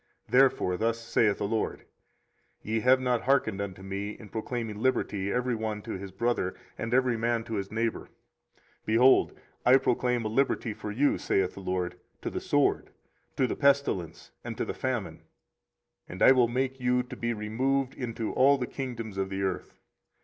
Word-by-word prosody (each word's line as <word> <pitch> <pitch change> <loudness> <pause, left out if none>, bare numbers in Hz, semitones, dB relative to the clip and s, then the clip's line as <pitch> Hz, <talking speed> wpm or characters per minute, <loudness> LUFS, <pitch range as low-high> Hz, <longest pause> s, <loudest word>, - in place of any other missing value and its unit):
24:034:017 - - -19
Therefore 125 -8 +4
thus 115 +2 0
saith 110 -2 +1
the 100 - -2
LORD; 110 +1 -2 0.8
Ye 110 +1 -1
have 130 +3 +5
not 125 -2 +1
hearkened 115 -6 +1
unto 95 -1 -6
me, 100 +2 -4
in 110 - -12
proclaiming 110 -1 -4
liberty, 105 -5 0
every 125 +1 0
one 110 -2 -3
to - - -6
his 95 +1 -5
brother, 95 -2 -1 0.2
and 115 - -4
every 125 -1 +2
man 115 0 0
to 115 - -7
his 100 -2 -3
neighbour: 115 +1 -2 0.7
behold, 120 +4 +4 0.2
I 125 +2 +7
proclaim 125 -2 0
a - - +1
liberty 115 -1 0
for 105 - -7
you, 140 +7 +2
saith 95 -2 0
the - - -10
LORD, 90 -2 -3 0.2
to - - -3
the - - -4
sword, - - +1 0.5
to 130 - +3
the - - -2
pestilence, 140 - +1
and - - -6
to - - -1
the - - -4
famine; - - -3 0.9
and 90 - -2
I - - +9
will 125 -2 +5
make 130 +2 -2
you 125 0 +2
to 125 - -9
be 115 0 -2
removed 130 +5 -1
into 115 -3 -4
all 140 +2 +5
the 125 - -2
kingdoms 115 -7 -5
of 95 0 -1
the 95 0 -3
earth. 95 -2 -3
115 Hz, 180 wpm, -28 LUFS, 105-125 Hz, 0.9 s, I